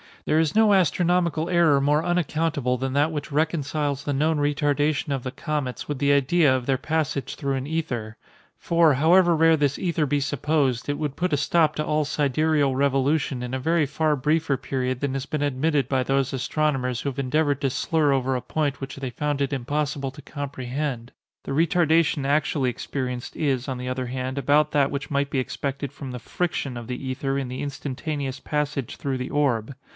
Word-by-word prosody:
There 155 Hz, -, +2 dB
is 160 Hz, +1 st, +1 dB
no 220 Hz, -1 st, +5 dB
astronomical 175 Hz, -2 st, +2 dB
error 170 Hz, -6 st, +4 dB
more 150 Hz, +3 st, +2 dB
unaccountable 160 Hz, -6 st, 0 dB
than 130 Hz, +1 st, -3 dB
that 145 Hz, +3 st, +2 dB
which 150 Hz, -2 st, -5 dB
reconciles 145 Hz, -2 st, -1 dB
the 145 Hz, -, -1 dB
known 155 Hz, +3 st, +1 dB
retardation 145 Hz, 0 st, +1 dB
of 135 Hz, -, -2 dB
the 130 Hz, -, -4 dB
comets 145 Hz, -4 st, -3 dB
with 145 Hz, -, -3 dB
the 140 Hz, 0 st, +3 dB
idea 140 Hz, +1 st, +4 dB
of 125 Hz, -2 st, -3 dB
their 135 Hz, -1 st, +2 dB
passage 155 Hz, -3 st, -2 dB
through 140 Hz, -1 st, -2 dB
an 130 Hz, 0 st, -3 dB
ether: 125 Hz, -9 st, -3 dB, 0.4 s
for, 165 Hz, -4 st, +3 dB
however 170 Hz, +4 st, +5 dB
rare 165 Hz, 0 st, +5 dB
this 145 Hz, -1 st, +1 dB
ether 170 Hz, -4 st, 0 dB
be 145 Hz, +1 st, +1 dB
supposed, 140 Hz, -2 st, 0 dB
it 145 Hz, -, 0 dB
would 150 Hz, -3 st, -2 dB
put 180 Hz, -2 st, -1 dB
a -, -, +3 dB
stop 155 Hz, +1 st, +2 dB
to 150 Hz, -, -1 dB
all 150 Hz, 0 st, +1 dB
sidereal 145 Hz, -1 st, +1 dB
revolution 135 Hz, 0 st, +1 dB
in 125 Hz, +1 st, -5 dB
a -, -, -2 dB
very 160 Hz, +3 st, +2 dB
far 155 Hz, +2 st, +1 dB
briefer 150 Hz, +1 st, +1 dB
period 130 Hz, -1 st, -2 dB
than 140 Hz, -2 st, -1 dB
has 135 Hz, 0 st, -3 dB
been 150 Hz, -, -2 dB
admitted 145 Hz, -1 st, +1 dB
by 130 Hz, -1 st, +2 dB
those 135 Hz, +1 st, 0 dB
astronomers 130 Hz, -2 st, -1 dB
who 140 Hz, -, -1 dB
have 135 Hz, 0 st, -6 dB
endeavored 145 Hz, +1 st, +1 dB
to 135 Hz, -, +1 dB
slur 150 Hz, +2 st, +1 dB
over 135 Hz, -1 st, +1 dB
a 125 Hz, -, -2 dB
point 145 Hz, -2 st, -2 dB
which 135 Hz, +1 st, -6 dB
they 135 Hz, -2 st, -4 dB
found 145 Hz, +2 st, -2 dB
it 140 Hz, +1 st, 0 dB
impossible 140 Hz, +1 st, -2 dB
to 145 Hz, -, -12 dB
comprehend. 135 Hz, -3 st, -4 dB, 0.3 s
The -, -, -6 dB
retardation 160 Hz, -1 st, +2 dB
actually 140 Hz, -2 st, +1 dB
experienced 125 Hz, 0 st, -5 dB
is, 135 Hz, -4 st, 0 dB
on 130 Hz, -2 st, -3 dB
the 125 Hz, 0 st, -4 dB
other 130 Hz, 0 st, -3 dB
hand, 130 Hz, +1 st, -4 dB
about 150 Hz, +3 st, +3 dB
that 140 Hz, -2 st, +2 dB
which 140 Hz, +1 st, -4 dB
might 140 Hz, 0 st, 0 dB
be 140 Hz, -, 0 dB
expected 140 Hz, +1 st, -3 dB
from 140 Hz, -2 st, -8 dB
the 125 Hz, -, -6 dB
friction 145 Hz, -2 st, -2 dB
of 120 Hz, -1 st, -7 dB
the 125 Hz, +2 st, -5 dB
ether 135 Hz, +1 st, -2 dB
in 135 Hz, -, -3 dB
the 130 Hz, -, -5 dB
instantaneous 140 Hz, 0 st, -4 dB
passage 145 Hz, -4 st, -2 dB
through 135 Hz, -2 st, -2 dB
the 125 Hz, -, -4 dB
orb. 135 Hz, -5 st, 0 dB
145 Hz, 195 wpm, -24 LUFS, 130-155 Hz, 0.4 s, no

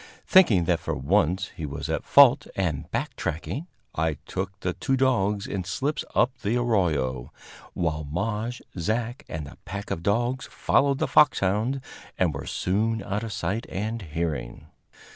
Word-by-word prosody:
Thinking 120 Hz, -, +6 dB
that 85 Hz, 0 st, +1 dB
for -, -, -3 dB
once 90 Hz, +6 st, +1 dB
he 80 Hz, -, -7 dB
was 70 Hz, -, -5 dB
at -, -, -1 dB
fault, -, -, +6 dB
and 85 Hz, -7 st, -1 dB
back -, -, -2 dB
tracking, 125 Hz, -, -3 dB, 0.3 s
I 80 Hz, -1 st, 0 dB
took 95 Hz, +1 st, -4 dB
the 90 Hz, -, -1 dB
two 135 Hz, +6 st, 0 dB
dogs 105 Hz, -6 st, +2 dB
in 95 Hz, -2 st, -3 dB
slips 140 Hz, -, -2 dB
up 125 Hz, +2 st, +3 dB
the 110 Hz, +2 st, 0 dB
arroyo, 80 Hz, -, 0 dB, 0.4 s
while 80 Hz, -3 st, -1 dB
Maje, 105 Hz, +10 st, -3 dB, 0.2 s
Zach 115 Hz, -, -1 dB
and 80 Hz, -2 st, -4 dB
the 70 Hz, -, -12 dB
pack 100 Hz, +2 st, -6 dB
of 85 Hz, -, -2 dB
dogs 120 Hz, +7 st, 0 dB
followed 140 Hz, 0 st, +2 dB
the -, -, 0 dB
foxhound, 120 Hz, -1 st, +3 dB, 0.4 s
and 90 Hz, -5 st, +2 dB
were 70 Hz, -, -6 dB
soon 110 Hz, +3 st, 0 dB
out 100 Hz, +2 st, -2 dB
of 115 Hz, -1 st, -5 dB
sight 100 Hz, +2 st, -2 dB
and 110 Hz, +4 st, -3 dB
hearing. 80 Hz, -7 st, -4 dB
100 Hz, 160 wpm, -26 LUFS, 85-115 Hz, 0.4 s, Thinking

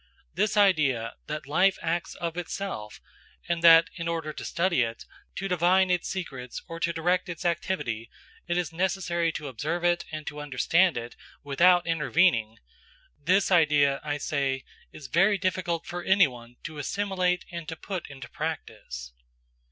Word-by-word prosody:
This 210 Hz, 0 st, 0 dB
idea, 145 Hz, -, +3 dB
that 150 Hz, -1 st, -4 dB
life 180 Hz, +7 st, +3 dB
acts 170 Hz, +1 st, -2 dB
of 170 Hz, -1 st, -4 dB
itself, 175 Hz, -, -5 dB, 0.5 s
and 170 Hz, 0 st, -1 dB
that 165 Hz, 0 st, +8 dB
in 165 Hz, -1 st, -4 dB
order 165 Hz, -2 st, -2 dB
to -, -, -7 dB
study 170 Hz, -5 st, +1 dB
it, 115 Hz, -1 st, -3 dB, 0.3 s
to 195 Hz, -, -3 dB
divine 180 Hz, +1 st, +3 dB
its 180 Hz, -1 st, 0 dB
secrets 135 Hz, -10 st, -5 dB
or 165 Hz, 0 st, -7 dB
to 170 Hz, -, +1 dB
direct 175 Hz, +3 st, 0 dB
its 175 Hz, +1 st, -6 dB
activity, 160 Hz, -, -2 dB, 0.4 s
it 175 Hz, 0 st, 0 dB
is 170 Hz, -3 st, -2 dB
necessary 175 Hz, -1 st, 0 dB
to 150 Hz, -, -5 dB
observe 155 Hz, +7 st, -3 dB
it 175 Hz, 0 st, +2 dB
and 155 Hz, -1 st, -6 dB
to 150 Hz, 0 st, -6 dB
understand 150 Hz, +4 st, +2 dB
it 120 Hz, 0 st, -6 dB, 0.3 s
without 175 Hz, +5 st, +4 dB
intervening–this 155 Hz, -, 0 dB
idea, 145 Hz, -5 st, +4 dB
I 145 Hz, -1 st, -2 dB
say, 135 Hz, -2 st, -1 dB, 0.3 s
is 155 Hz, -, -11 dB
very 195 Hz, +9 st, +3 dB
difficult 180 Hz, -3 st, -1 dB
for 175 Hz, 0 st, -5 dB
anyone 125 Hz, -11 st, +2 dB
to 155 Hz, -1 st, -7 dB
assimilate 185 Hz, +2 st, -1 dB
and 170 Hz, -2 st, -6 dB
to 160 Hz, -, -4 dB
put 180 Hz, -1 st, -6 dB
into 135 Hz, -3 st, -9 dB
practice. 105 Hz, -, -6 dB
165 Hz, 150 wpm, -27 LUFS, 140-180 Hz, 0.5 s, that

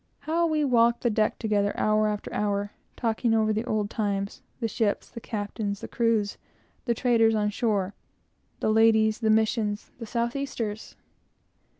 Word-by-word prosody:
How 330 Hz, +3 st, +1 dB
we 310 Hz, -2 st, +1 dB
walked 235 Hz, -2 st, +3 dB
the 240 Hz, -, +2 dB
deck 215 Hz, 0 st, +1 dB
together, 205 Hz, -2 st, 0 dB
hour 215 Hz, 0 st, +2 dB
after 210 Hz, -1 st, -4 dB
hour, 205 Hz, 0 st, -1 dB, 0.2 s
talking 225 Hz, 0 st, 0 dB
over 215 Hz, -1 st, +2 dB
the 215 Hz, +2 st, -1 dB
old 215 Hz, -3 st, -1 dB
times, 200 Hz, -2 st, -2 dB, 0.2 s
the 230 Hz, -, 0 dB
ships, 215 Hz, -2 st, -1 dB
the 230 Hz, -, -10 dB
captains, 205 Hz, -2 st, -4 dB
the -, -, -6 dB
crews, 225 Hz, -3 st, 0 dB, 0.5 s
the 235 Hz, -2 st, +1 dB
traders 225 Hz, -2 st, +3 dB
on 210 Hz, -1 st, +1 dB
shore, 205 Hz, -3 st, 0 dB, 0.7 s
the 215 Hz, -, +2 dB
ladies, 220 Hz, -1 st, +4 dB
the 220 Hz, -2 st, +1 dB
Missions, 215 Hz, -1 st, +1 dB
the 230 Hz, -, -6 dB
south 235 Hz, +2 st, -1 dB
easters! 230 Hz, -6 st, -4 dB
220 Hz, 160 wpm, -26 LUFS, 210-235 Hz, 0.7 s, ladies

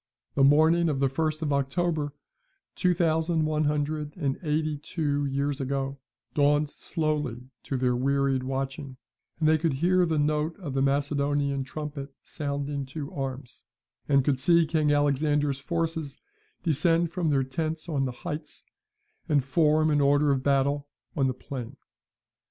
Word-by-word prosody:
The 140 Hz, -, +3 dB
morning 160 Hz, +4 st, +5 dB
of 140 Hz, -3 st, -1 dB
the 135 Hz, -1 st, +2 dB
first 155 Hz, +2 st, -1 dB
of 145 Hz, -2 st, 0 dB
October, 145 Hz, +2 st, 0 dB, 0.6 s
two 180 Hz, -2 st, +1 dB
thousand 160 Hz, -1 st, +1 dB
one 155 Hz, 0 st, +1 dB
hundred 150 Hz, +1 st, -1 dB
and 140 Hz, -5 st, -1 dB
eighty 155 Hz, -2 st, -1 dB
two 145 Hz, -2 st, -1 dB
years 140 Hz, +1 st, -1 dB
ago, 135 Hz, 0 st, -2 dB, 0.3 s
dawned 145 Hz, 0 st, +3 dB
slowly 150 Hz, -7 st, -3 dB
to 135 Hz, -, -3 dB
their 125 Hz, -1 st, +1 dB
wearied 135 Hz, +1 st, +1 dB
watching, 135 Hz, +1 st, -4 dB, 0.4 s
and 155 Hz, -, +2 dB
they 155 Hz, 0 st, +4 dB
could 160 Hz, -2 st, +1 dB
hear 175 Hz, +5 st, +3 dB
the 160 Hz, -1 st, 0 dB
note 150 Hz, +2 st, 0 dB
of 150 Hz, -8 st, -5 dB
the 135 Hz, -, +1 dB
Macedonian 140 Hz, 0 st, +1 dB
trumpet 140 Hz, 0 st, -6 dB
sounding 140 Hz, -1 st, -3 dB
to 140 Hz, +1 st, -6 dB
arms, 135 Hz, -2 st, -5 dB, 0.5 s
and 140 Hz, -2 st, +4 dB
could 140 Hz, -3 st, +1 dB
see 170 Hz, +4 st, +4 dB
King 155 Hz, -1 st, +1 dB
Alexander's 145 Hz, -1 st, +2 dB
forces 160 Hz, -1 st, -3 dB, 0.5 s
descend 165 Hz, +1 st, +2 dB
from 170 Hz, -2 st, -1 dB
their 135 Hz, -2 st, +2 dB
tents 155 Hz, +5 st, -3 dB
on 140 Hz, -5 st, 0 dB
the 130 Hz, -, -2 dB
heights, 150 Hz, -3 st, -6 dB, 0.6 s
and 145 Hz, -3 st, +3 dB
form 155 Hz, +2 st, +3 dB
in 145 Hz, -1 st, +3 dB
order 145 Hz, +1 st, +4 dB
of 135 Hz, -1 st, +1 dB
battle 140 Hz, +1 st, +1 dB, 0.3 s
on 135 Hz, -3 st, +2 dB
the 130 Hz, -, 0 dB
plain. 130 Hz, -3 st, -7 dB
145 Hz, 150 wpm, -27 LUFS, 140-155 Hz, 0.6 s, morning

